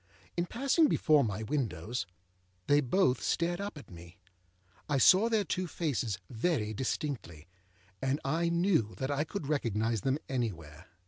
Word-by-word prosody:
In 175 0 -1
passing 275 - +3
before 155 - +4
my 110 -1 -2
windows, 115 - -2 0.6
they 145 +1 +4
both 135 0 +2
stared 175 +2 0
up 200 -5 -5
at 140 - -12
me. 85 +2 -12 0.7
I 145 - +2
saw 190 - +6
their 220 -3 +2
two 185 0 -2
faces 130 - -2
very 115 -3 -1
distinctly, 110 - -4 0.5
and 135 +2 0
I 165 +4 +1
knew 170 - +1
that 130 +2 -2
I 145 +1 +1
could 165 0 -5
recognise 115 -6 0
them 135 +5 +1
anywhere. 90 - -4
135 Hz, 145 wpm, -31 LUFS, 110-170 Hz, 0.7 s, saw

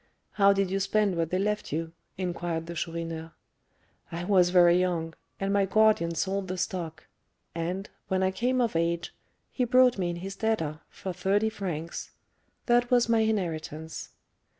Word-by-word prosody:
"How 200 -1 +5
did 195 -1 +1
you 195 - +1
spend 195 0 +1
what 165 -1 0
they 185 - 0
left 210 +2 -1
you?" 165 +2 -2 0.3
inquired 175 -3 -2
the 170 - -6
Chourineur. 165 -1 -4 0.8
"I 170 +1 -4
was 180 -2 +4
very 175 -1 +6
young, 170 -3 -1 0.3
and 195 0 0
my 200 -1 +3
guardian 210 -5 +3
sold 195 +3 -1
the 185 0 -3
stock; 175 -4 -4 0.5
and, 180 +4 -3 0.2
when 190 -1 +1
I 190 - +2
came 250 +5 +1
of 230 -7 0
age, 170 +1 0 0.4
he 255 - 0
brought 250 -2 +4
me 180 -2 0
in 175 - -3
his 190 +3 -6
debtor 195 -9 -1
for 190 - -6
thirty 195 +5 +1
francs; 175 -6 -5 0.6
that 240 0 +3
was 245 -2 +3
my 230 -1 +4
inheritance." 160 -7 -2
185 Hz, 165 wpm, -28 LUFS, 170-205 Hz, 0.8 s, very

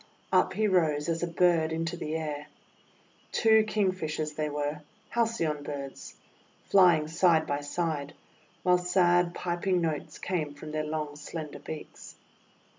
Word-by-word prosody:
Up - - +4
he 215 0 +1
rose 160 -6 +2
as 165 0 -1
a 175 - 0
bird 170 -2 +3
into 165 +2 -2
the 160 -2 -4
air. 150 -2 -4 0.8
Two 220 -1 +5
King 210 -3 +1
fishers 155 -4 -3
they 150 0 -2
were, 145 +1 -3
— 215 - -34
Halcyon 220 -11 0
Birds, 140 -2 -7 0.3
— - - -34
flying 175 -6 +6
side 165 0 +3
by 145 0 -1
side, 145 -1 -3 0.5
while 180 0 +4
sad, 175 -1 +3
piping 180 +1 0
notes 160 -3 -2
came 155 -6 -2
from 150 +2 -8
their 155 0 -1
long, 150 -1 -3
slender 150 0 -7
beaks. 155 -1 -9
160 Hz, 150 wpm, -29 LUFS, 150-180 Hz, 0.8 s, flying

